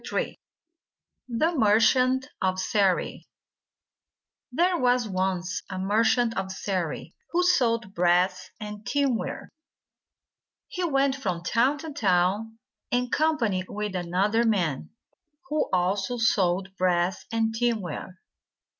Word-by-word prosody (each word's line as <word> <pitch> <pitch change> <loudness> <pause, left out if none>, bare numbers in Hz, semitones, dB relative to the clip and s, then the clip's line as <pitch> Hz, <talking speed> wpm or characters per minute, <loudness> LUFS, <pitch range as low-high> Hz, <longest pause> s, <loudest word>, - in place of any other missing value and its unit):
Ill - - +1 1.1
THE 315 +9 +1
MERCHANT 255 +3 +3
OF 185 0 0
SERI 190 -1 0 1.2
THERE 350 +7 +2
was 245 -2 +2
once 185 -2 -2
a 190 - -5
merchant 225 +4 +2
of 190 0 -3
Seri 185 -4 -3 0.2
who 355 +1 +1
sold 230 - +2
brass 180 +1 +2
and 210 -1 -7
tinware. 275 -2 -1 1.2
He 365 - -4
went 275 -4 +2
from 185 -10 -3
town 250 +9 +2
to 320 +1 -7
town, 200 +1 +1 0.3
in 245 0 0
company 240 -12 +1
with 210 -1 -4
another 185 +6 +1
man, 180 - 0 0.6
who 305 +1 0
also 190 +5 0
sold 195 -4 +1
brass 180 0 +1
and 225 -1 0
tinware. 215 -6 -2
210 Hz, 110 wpm, -26 LUFS, 185-245 Hz, 1.2 s, MERCHANT